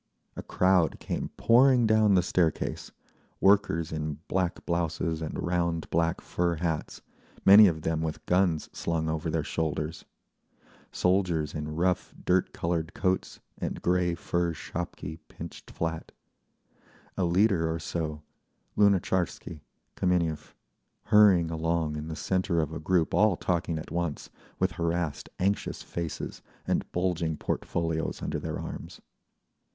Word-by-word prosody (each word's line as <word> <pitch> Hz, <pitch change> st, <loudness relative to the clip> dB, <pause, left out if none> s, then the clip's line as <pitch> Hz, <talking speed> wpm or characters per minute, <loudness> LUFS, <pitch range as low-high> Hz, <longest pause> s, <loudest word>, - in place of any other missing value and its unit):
A -, -, -5 dB
crowd 90 Hz, -3 st, +2 dB
came -, -, -3 dB
pouring 125 Hz, +1 st, +5 dB
down 110 Hz, -2 st, +4 dB
the 90 Hz, -, +4 dB
staircase, 85 Hz, -3 st, 0 dB, 0.5 s
workers 95 Hz, -5 st, +3 dB
in 75 Hz, -1 st, -3 dB
black 90 Hz, -2 st, -1 dB
blouses 85 Hz, -1 st, -1 dB
and 80 Hz, -, -4 dB
round 85 Hz, -2 st, -1 dB
black 85 Hz, 0 st, +1 dB
fur 85 Hz, -1 st, -1 dB
hats, 80 Hz, -1 st, -3 dB, 0.4 s
many 100 Hz, +2 st, +10 dB
of 80 Hz, -3 st, -1 dB
them 80 Hz, -1 st, 0 dB
with 80 Hz, -1 st, -4 dB
guns 90 Hz, -3 st, +2 dB
slung 80 Hz, -1 st, -1 dB
over 80 Hz, +1 st, -2 dB
their 80 Hz, -1 st, 0 dB
shoulders, 80 Hz, -1 st, -3 dB, 0.9 s
soldiers 90 Hz, -5 st, +1 dB
in 75 Hz, 0 st, -4 dB
rough 90 Hz, +2 st, 0 dB
dirt 90 Hz, 0 st, +2 dB
coloured 85 Hz, +2 st, -2 dB
coats 95 Hz, -4 st, -1 dB, 0.2 s
and -, -, -4 dB
grey 90 Hz, -1 st, +2 dB
fur 85 Hz, 0 st, -1 dB
shapki 80 Hz, 0 st, -6 dB
pinched 85 Hz, 0 st, -10 dB
flat, 80 Hz, -1 st, -4 dB, 1.0 s
a 95 Hz, -, 0 dB
leader 85 Hz, -2 st, +3 dB
or 80 Hz, -, -1 dB
so—Lunatcharsky, 85 Hz, +2 st, -2 dB, 0.3 s
Kameniev—hurrying 90 Hz, -, +1 dB
along 80 Hz, -1 st, -1 dB
in 75 Hz, +1 st, -5 dB
the 80 Hz, -, -5 dB
centre 90 Hz, -1 st, 0 dB
of 80 Hz, -1 st, -1 dB
a 80 Hz, -, -4 dB
group 85 Hz, 0 st, +1 dB
all 100 Hz, +1 st, +4 dB
talking 85 Hz, -2 st, -1 dB
at 80 Hz, -, -7 dB
once, 85 Hz, -3 st, -3 dB, 0.3 s
with -, -, +1 dB
harassed 85 Hz, -3 st, -2 dB
anxious 100 Hz, +2 st, -1 dB
faces, 85 Hz, -2 st, -5 dB, 0.2 s
and -, -, -1 dB
bulging 85 Hz, -3 st, -1 dB
portfolios 80 Hz, -1 st, -2 dB
under -, -, -2 dB
their -, -, -4 dB
arms. -, -, -7 dB
85 Hz, 125 wpm, -28 LUFS, 80-90 Hz, 1.0 s, many